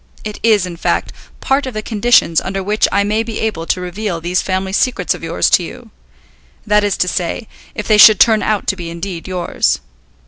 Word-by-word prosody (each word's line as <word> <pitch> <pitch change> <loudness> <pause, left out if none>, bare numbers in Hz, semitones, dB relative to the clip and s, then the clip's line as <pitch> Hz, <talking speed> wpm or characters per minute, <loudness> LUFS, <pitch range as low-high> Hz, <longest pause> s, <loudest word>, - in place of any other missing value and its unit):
It 210 -1 -6
is, 215 -5 +3
in 175 -2 -8
fact, - - -1 0.3
part 270 0 0
of 255 - -7
the 215 - -3
conditions 215 -7 +2
under 195 0 -4
which 210 +3 +1
I 200 - +2
may 210 +2 0
be 225 -1 -5
able 170 -7 -3
to - - 0
reveal 180 0 -4
these 175 +2 -1
family 190 0 -3
secrets 210 -5 +1
of - - -10
yours 165 0 0
to 180 - +4
you. 235 +5 -10 0.7
That 210 -1 +3
is 205 -1 0
to 180 - +1
say, 180 +5 -3 0.3
if 210 - -5
they 215 -1 +4
should 215 -2 +8
turn 220 -2 +5
out 215 -2 -1
to - - 0
be 175 -3 -7
indeed 170 +1 -6
yours. 180 -2 -1
200 Hz, 210 wpm, -16 LUFS, 180-215 Hz, 0.7 s, should